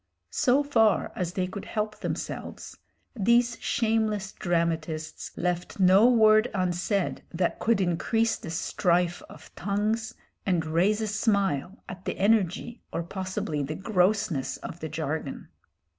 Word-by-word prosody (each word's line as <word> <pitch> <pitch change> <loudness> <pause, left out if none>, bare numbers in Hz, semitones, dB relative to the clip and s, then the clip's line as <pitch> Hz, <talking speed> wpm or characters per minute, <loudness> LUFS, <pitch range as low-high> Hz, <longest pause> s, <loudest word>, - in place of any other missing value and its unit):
So 265 +2 +3
far 225 -8 +3
as 175 -1 -2
they 185 -1 0
could 185 +2 -7
help 215 0 -3
themselves, - - -5 0.4
these 235 +2 +3
shameless 220 -3 0
dramatists 165 -3 -2
left 180 +2 -2
no 190 +5 +6
word 220 -1 +5
unsaid 185 +1 0
that 175 0 -1
could 225 -2 +2
increase 225 +6 +1
the - - -8
strife 175 +1 +1
of - - -14
tongues 210 +3 -1 0.3
and 175 -4 +1
raise 185 +7 +2
a 220 - -1
smile 200 - 0
at 185 0 -9
the - - -3
energy 210 +2 +1
or 170 - -2
possibly 185 -4 -3
the 145 +3 -3
grossness 185 - +1
of - - -8
the - - -5
jargon. - - -4
195 Hz, 130 wpm, -27 LUFS, 175-220 Hz, 0.4 s, no